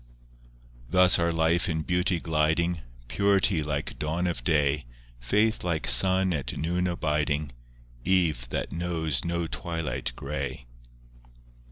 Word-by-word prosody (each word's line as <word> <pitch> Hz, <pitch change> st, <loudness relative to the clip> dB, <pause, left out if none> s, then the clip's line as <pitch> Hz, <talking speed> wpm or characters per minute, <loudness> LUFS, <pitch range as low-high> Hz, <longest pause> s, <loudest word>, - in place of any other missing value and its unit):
VII -, -, -27 dB
Thus 90 Hz, -1 st, +5 dB
our 85 Hz, 0 st, +1 dB
life 85 Hz, +3 st, +1 dB
in 80 Hz, -1 st, -1 dB
beauty 90 Hz, +1 st, +1 dB
gliding— 80 Hz, +1 st, 0 dB, 0.3 s
Purity 100 Hz, 0 st, +2 dB
like 75 Hz, -1 st, -4 dB
dawn 80 Hz, +4 st, -1 dB
of 85 Hz, -9 st, -2 dB
day, 75 Hz, 0 st, +1 dB, 0.3 s
Faith 105 Hz, -, +1 dB
like 85 Hz, -3 st, -1 dB
sun 95 Hz, +9 st, +5 dB
at 70 Hz, -5 st, -3 dB
noon 90 Hz, +4 st, -1 dB
abiding, 75 Hz, -3 st, -1 dB, 0.5 s
Eve 80 Hz, -10 st, +1 dB
that -, -, -3 dB
knows 80 Hz, -6 st, -2 dB
no 85 Hz, 0 st, -1 dB
twilight 80 Hz, -5 st, -3 dB
grey. 70 Hz, -2 st, -5 dB
80 Hz, 125 wpm, -27 LUFS, 70-90 Hz, 0.5 s, Thus